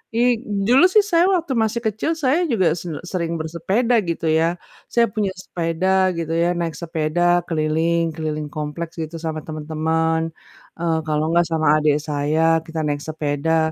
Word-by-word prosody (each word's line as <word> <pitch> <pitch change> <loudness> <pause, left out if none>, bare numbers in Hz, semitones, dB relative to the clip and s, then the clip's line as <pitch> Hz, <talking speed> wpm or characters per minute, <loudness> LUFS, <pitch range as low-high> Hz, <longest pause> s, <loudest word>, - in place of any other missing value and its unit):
i 240 0 +2 0.3
dulu 265 +8 +6
sih 415 +1 +4
saya 345 -3 +3
waktu 335 -7 0
masih 225 0 +1
kecil 220 +9 -1
saya 295 +4 +2
juga 185 -9 +2
sen 165 -3 -6
sering 170 -2 -2
bersepeda 190 +10 0
gitu 165 - -3
ya. 165 +2 +2 0.4
Saya 235 -1 +5
punya 205 -3 0
sepeda 185 +2 0
gitu 165 -1 -3
ya, 170 +1 +2
naik 165 -2 -2
sepeda 160 0 -2 0.3
keliling 165 +1 +1
keliling 155 -2 -3
kompleks 155 +3 -5
gitu 160 +1 -6
sama 160 -1 -3
temen-temen. 160 +1 -1 0.6
Eee, 165 -1 +1
kalau 150 0 0
gak 175 - +4
sama 155 -2 +3
adik 150 -1 +3
saya 155 +2 +1
kita 160 0 -5
naik 145 -1 -1
sepeda. 160 +1 0
165 Hz, 160 wpm, -21 LUFS, 155-190 Hz, 0.6 s, dulu